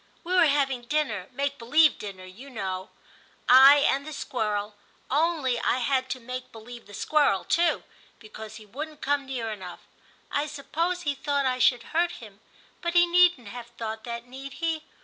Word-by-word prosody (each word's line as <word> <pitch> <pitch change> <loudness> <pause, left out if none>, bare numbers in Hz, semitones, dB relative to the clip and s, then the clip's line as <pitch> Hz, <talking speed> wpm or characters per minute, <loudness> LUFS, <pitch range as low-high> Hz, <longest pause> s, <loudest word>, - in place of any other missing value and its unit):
We 360 +1 -3
were 365 -3 +6
having 275 -3 +1
dinner 235 -11 -1
— - - -32
make 280 +2 -2
believe 295 +6 +4
dinner, 195 -3 -8
you 215 +10 -12
know 190 -6 -4 0.3
— - - -29 0.2
I 275 +3 +8
and 275 +1 +1
the 310 +1 -8
squirrel 210 -6 -2 0.2
— - - -23
^only 290 -4 +1
I - - +2
had 260 +1 0
to 260 - -3
make 255 +1 -7
believe 235 +1 -11
the 205 - -11
squirrel 285 -7 +2
too, 340 +1 +1 0.3
because 220 -1 -10
he 215 -1 -11
wouldn't 300 +8 -8
come 285 0 0
near 240 -4 -3
enough 185 -4 -8 0.3
— - - -32
I 290 +1 0
suppose 330 +5 -2
he 290 - 0
thought 280 0 -1
I 255 -1 0
should 245 -1 +3
hurt 345 +2 +2
him, 210 -4 -12 0.4
but 340 0 -2
he 350 0 +7
needn't 350 - +4
have 240 +1 -8
thought 225 -2 -6
that, 235 0 -5
need 265 +2 -9
he 325 -1 -2
260 Hz, 190 wpm, -26 LUFS, 225-300 Hz, 0.4 s, I